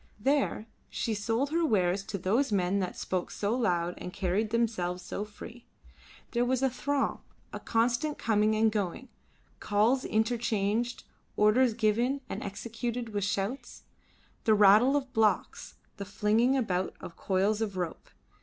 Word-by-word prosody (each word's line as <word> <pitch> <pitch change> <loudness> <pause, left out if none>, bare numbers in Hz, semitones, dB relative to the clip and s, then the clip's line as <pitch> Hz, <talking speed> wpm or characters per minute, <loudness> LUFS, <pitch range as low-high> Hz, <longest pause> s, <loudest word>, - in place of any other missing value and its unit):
There 270 -2 +1 0.2
she 225 - -2
sold 230 +7 -1
her 335 +1 +1
wares 195 - +2
to 200 - -4
those 215 +9 +1
men 195 0 +1
that 185 -2 -3
spoke 185 -1 -2
so 210 +3 -1
loud 175 -8 0
and 180 - -6
carried 195 +4 -1
themselves 210 -6 -1
so 200 - -4
free. 225 +3 -11 0.6
There 240 0 +1
was 255 +1 0
a 265 - +2
throng, 280 +2 -1 0.3
a - - -4
constant 240 +6 0
coming 215 -1 +2
and 220 0 +3
going; 210 +4 -3 0.5
calls 220 +6 +2
interchanged, 225 0 0 0.3
orders 225 +3 +4
given 235 +5 +1
and - - -4
executed 235 +3 -4
with 205 -2 -2
shouts; 200 +6 -3 0.6
the 220 -2 +5
rattle 210 +6 +6
of 265 -3 -2
blocks, 220 -3 0 0.2
the 200 - -5
flinging 215 +6 +2
about 190 -7 -1
of 170 - -9
coils 200 +3 0
of 205 -4 -2
rope. 175 -3 -4
220 Hz, 145 wpm, -29 LUFS, 200-245 Hz, 0.6 s, rattle